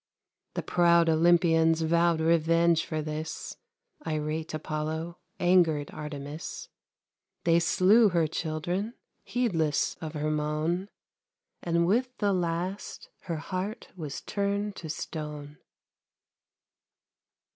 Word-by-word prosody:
The - - -2
proud 170 -1 +4
Olympians 165 0 +4
vowed 170 0 +3
revenge 165 0 +3
for 155 -1 -2
this, 155 +1 -5 0.5
Irate 155 +1 -2
Apollo, 155 +2 -4 0.2
angered 170 -5 +3
Artemis; 150 0 -7 0.7
They 170 0 +4
slew 200 +6 +5
her 170 -3 +2
children, 175 +8 -3 0.3
heedless 165 -12 0
of 160 -1 -5
her 155 0 -1
moan, 155 +5 -1 0.7
And 170 0 +1
with 250 +7 +1
the 205 -2 +1
last 180 +2 -3 0.2
her 165 -3 -2
heart 190 +7 -4
was 155 -6 -6
turned 200 0 -2
to 160 - -7
stone. 150 -1 -6
165 Hz, 100 wpm, -28 LUFS, 155-180 Hz, 0.7 s, slew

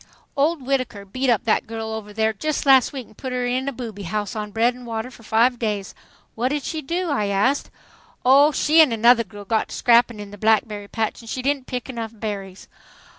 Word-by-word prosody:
"Old 290 0 +1
Whittaker 255 -7 -2
beat 255 +7 -2
up 230 -4 +2
that 220 - +1
girl 225 0 -5
over 220 -1 -6
there 220 +1 0
just 305 +9 -2
last 265 -2 +6
week 265 -4 -6
and 215 - -21
put 260 +3 -6
her 250 0 -1
in 255 +2 -1
the 275 - -1
'booby' 230 -5 -7
house 210 +1 -3
on 210 -1 -4
bread 230 +4 +2
and 250 0 -12
water 225 +2 -4
for 230 - -15
five 230 +2 +2
days." 210 -4 -2 0.4
"What 235 +3 -1
did 290 +1 -2
she 315 -2 -3
do?" 340 +4 -2
I 210 -8 0
asked. 205 +8 +1 0.6
"Oh, 280 +4 +6
she 310 +2 +4
an' 305 -5 +5
another 230 +1 +5
girl 205 0 -12
got 220 +2 0
to - - -6
scrapping 235 -2 +3
in 205 -1 -8
the 205 - -11
blackberry 215 -1 +1
patch 220 +2 -3
and 230 - -12
she 255 - -4
didn't 275 -1 -1
pick 250 -2 -4
enough 230 -3 -5
berries. 200 -3 -6
230 Hz, 225 wpm, -22 LUFS, 215-260 Hz, 0.6 s, last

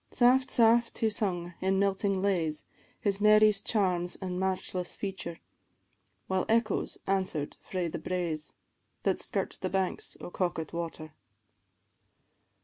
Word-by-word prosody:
Saft, 255 +2 +4
saft 235 0 +4
he 220 -1 +1
sung, 175 -5 -2
in 190 +1 +2
melting 195 0 +1
lays, 165 -6 0 0.3
His 200 -1 0
Mary's 215 -1 +6
charms 180 -5 +1
an' 185 -2 -4
matchless 185 -1 -1
feature, 190 -4 -5 0.9
While 190 -1 0
echoes 225 -2 +1
answer'd 190 -6 -1
frae 180 -2 -3
the 170 0 -4
braes, 165 -3 -3 0.5
That - - +1
skirt - - -3
the - - -1
banks 190 -1 -1
of 175 - -9
Coquet 175 -4 -2
water. 165 -2 -5
190 Hz, 125 wpm, -30 LUFS, 175-205 Hz, 0.9 s, Mary's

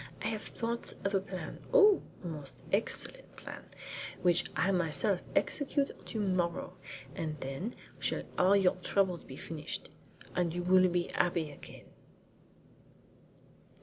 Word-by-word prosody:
I - - +1
have 215 -2 -2
thought 235 0 -3
of 195 - 0
a 195 - +5
plan 185 -1 -6
oh, 425 -6 +8 0.2
a - - -4
most 150 -4 -7
excellent - - -1
plan - - -8 0.6
which 175 -1 +4
I 190 - +3
will 185 - +3
myself 170 +4 +1
execute 285 -1 +2 0.2
to 220 - -3
morrow, 185 -3 0 0.4
and 155 0 -3
then 135 - -4 0.2
shall - - 0
all 185 +2 +6
your 190 -2 +4
troubles 185 -1 +1
be 130 - -9
finished, 155 -2 -5 0.4
and 175 -2 +1
you 175 - -1
will 185 +1 +6
be 175 -1 0
happy 170 -3 +1
again." 145 - -11
180 Hz, 140 wpm, -33 LUFS, 170-200 Hz, 0.6 s, oh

